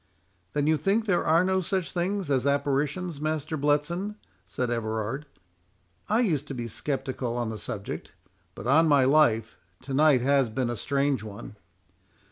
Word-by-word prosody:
"Then 145 -1 +1
you 155 +1 +3
think 200 +9 +1
there 180 -5 +2
are 165 +3 +4
no 190 0 +2
such 185 0 -2
things 185 -2 -1
as 135 0 +2
apparitions, 145 +4 0
Master 155 0 -2
Bletson?" 150 +8 0 0.3
said 125 -1 -2
Everard. 115 +4 -2 0.8
"I 220 +3 +3
used 155 - 0
to 140 - -5
be 120 -1 -4
sceptical 130 0 -3
on 120 -2 -2
the 110 - -6
subject; 100 -1 -6 0.4
but, - - -8
on 155 +6 +5
my 140 -3 +5
life, 125 -6 +3 0.2
to 135 +1 -6
night 145 -2 +5
has 135 -1 +3
been 120 +1 -1
a - - -3
strange 140 +1 0
one." 105 0 -9
140 Hz, 160 wpm, -27 LUFS, 125-160 Hz, 0.8 s, on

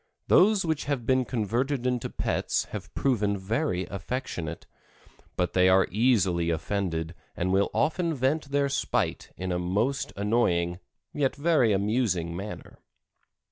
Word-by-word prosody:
Those 200 -1 +5
which 160 -2 -1
have 140 -5 -2
been 130 +1 +2
converted 120 +5 -1
into 125 -2 0
pets - - -1
have - - -7
proven 105 -7 +1
very 100 - -1
affectionate, 90 - -5 0.7
but 90 - -1
they 90 0 +5
are 95 +1 +5
easily 95 -6 +2
offended 85 -1 -2 0.2
and 95 +2 0
will 100 +1 +3
often 170 +1 +1
vent 140 +4 0
their 140 0 +2
spite 140 - -1
in 95 0 -3
a 90 - 0
most 105 +10 -1
annoying 90 -5 +1 0.3
yet 140 -3 0
very 145 -6 +3
amusing 100 -5 0
manner. 100 +4 -8
105 Hz, 135 wpm, -27 LUFS, 90-130 Hz, 0.7 s, Those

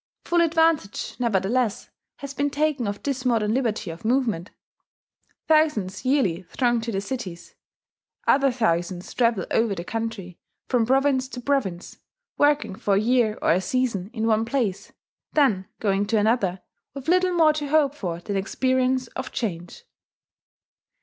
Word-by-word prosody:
Full 345 0 +2
advantage, 325 - +1
nevertheless, 225 0 0 0.2
has 280 -1 -8
been 285 0 0
taken 285 -4 0
of 205 0 -5
this 270 -3 -2
modern 225 -4 +1
liberty 225 -8 -1
of 165 - -11
movement: 225 -7 0 1.0
thousands 300 -13 +2
yearly 255 - +1
throng 240 -2 +1
to 230 +1 -4
the 195 - -1
cities; 200 -6 -6 0.7
other 275 -1 +4
thousands 180 -6 -1
travel 230 -6 +1
over 225 -3 +2
the 170 - -5
country, 225 -4 -5 0.3
from 240 -3 +1
province 265 0 +2
to 260 - -8
province; 245 -10 -2 0.4
working 290 -7 +2
for 195 +1 0
a - - +3
year 225 -1 +2
or - - +4
a 180 +3 +3
season 210 -3 -1
in 225 -3 -2
one 220 -1 +2
place, 230 -5 -2 0.4
then 215 -11 +2
going 200 -1 0
to 220 +1 +1
another, 205 -4 +1 0.3
with 275 +1 -8
little 365 +1 +3
more 320 -3 +5
to 300 -1 -3
hope 290 -1 +3
for 175 -11 -4
than 200 +2 -4
experience 255 +5 +1
of 260 0 -6
change. 200 - -5
235 Hz, 150 wpm, -24 LUFS, 200-275 Hz, 1.0 s, more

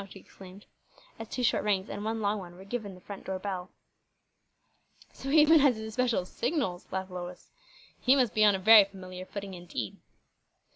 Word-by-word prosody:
she 195 - -12
exclaimed, 190 +1 -14 0.5
as 225 -1 -7
two 250 - -3
short 235 - +2
rings 200 -2 0
and 205 - -6
one 220 +1 -2
long 205 0 0
one 175 -2 -10
were 190 +2 -13
given 205 -3 -5
the - - -14
front 200 +1 -9
door 190 0 -3
bell. 185 -1 -5 1.4
"So 270 - -7
he 310 +3 +5
even 320 +1 +6
has 275 -4 +4
his 220 0 -6
especial 235 -4 0
signals," 190 - -2
laughed 190 0 -4
Lois. 180 0 -8 0.5
"He 260 +2 +4
must 250 -6 +2
be 215 - +3
on 205 -2 +6
a - - -1
very 215 +2 +8
familiar 185 -1 -10
footing, 200 -1 -7
indeed." 175 - -6
200 Hz, 190 wpm, -29 LUFS, 185-225 Hz, 1.4 s, very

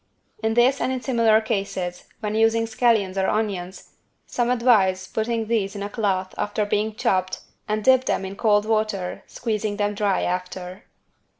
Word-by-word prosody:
In 220 0 0
this 255 +4 +4
and 260 - 0
in 260 - -2
similar 230 -4 +3
cases, 190 -4 -3 0.2
when 210 -1 -2
using 225 +1 +3
scallions 220 -4 +1
or 190 0 +1
onions, 195 -4 -3 0.4
some 240 -1 -1
advise 215 -7 +3
putting 225 +2 -1
these 215 -3 -1
in 200 - -4
a 200 - -4
cloth 195 -4 -1
after 210 0 -1
being 210 +1 -1
chopped 185 -3 0 0.3
and 215 0 -1
dip 260 +1 +5
them 190 - 0
in 190 +1 -6
cold 205 -1 +2
water 215 -4 -1
squeezing 215 -3 -3
them 205 0 0
dry 200 -2 0
after. 180 +1 -4
210 Hz, 165 wpm, -23 LUFS, 195-225 Hz, 0.4 s, dip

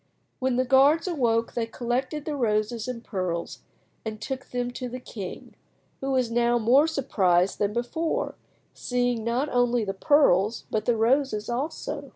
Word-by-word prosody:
When 260 -1 0
the 255 +1 +2
guards 275 +7 +4
awoke 235 -9 +1
they 230 -1 -1
collected 255 +5 -2
the 305 - -2
roses 220 -2 0
and 240 -2 -5
pearls 180 -5 -3 0.4
and 215 -1 -5
took 265 +4 -5
them 245 0 -3
to 250 0 -5
the 255 +1 -6
king, 200 -6 -8 0.5
who 270 - -3
was 255 -3 +1
now 240 0 +2
more 250 +7 +4
surprised 195 - +1
than 205 -1 +1
before, 320 - -2 0.4
seeing 245 -2 -1
not 240 +5 0
only 245 -3 +2
the 195 - -2
pearls 215 - +3
but 215 -1 -1
the 240 -2 +2
roses 230 -2 +1
also. 285 +2 -4
245 Hz, 160 wpm, -26 LUFS, 220-270 Hz, 0.5 s, guards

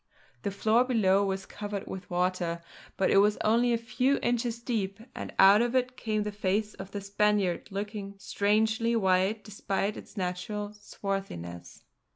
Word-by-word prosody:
The - - -1
floor 220 +4 +3
below 200 -6 +3
was 195 -1 -2
covered 205 -1 -5
with 190 -1 -7
water, 175 -1 -1 0.3
but 190 - +2
it - - +5
was 205 +1 +5
only 235 +3 +3
a 235 - +3
few 250 +4 +1
inches 240 -1 0
deep 215 -4 -2
and - - -6
out 200 +3 +8
of 240 +1 0
it 255 0 +1
came 215 -3 -1
the 210 - -3
face 205 +1 -1
of 195 0 -9
the 200 0 -5
Spaniard, 200 -2 +1
looking 200 0 -5
strangely 220 +4 +1
white 190 +1 +2
despite 200 0 -2
its - - -12
natural 200 +3 -3
swarthiness. 195 - -6
205 Hz, 160 wpm, -29 LUFS, 195-220 Hz, 0.3 s, out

